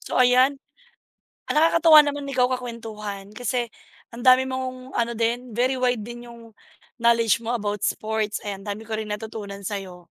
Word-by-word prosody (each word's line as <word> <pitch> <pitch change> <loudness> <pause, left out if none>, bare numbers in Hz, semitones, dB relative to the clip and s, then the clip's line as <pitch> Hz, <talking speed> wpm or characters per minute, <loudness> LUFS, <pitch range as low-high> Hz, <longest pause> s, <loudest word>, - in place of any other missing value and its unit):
So - - -3
ayan 255 +2 +4 0.9
nakakatuwa 315 -1 +6
naman 285 -1 -3
ikaw 250 -2 +3
kakwentuhan, 220 -5 -6
kasi 245 +1 -1 0.5
ang 240 - -8
dami 255 +1 +6
mong 260 0 -5
ano 235 -1 -1
din, 240 +2 -1
very 245 +4 +1
wide 250 -2 +1
din 240 +2 -9
yung 230 -2 -14 0.5
knowledge 230 -2 +3
mo 230 - -4
about 205 -1 -3
sports. 215 -1 -1
Ayan 195 -1 -5
ang 205 - -6
dami 220 - -12
ko 220 - -4
rin 215 -1 -4
natutunan 210 -2 -6
sa 205 - -2
'yo. 180 -2 -12
235 Hz, 165 wpm, -24 LUFS, 215-255 Hz, 0.9 s, nakakatuwa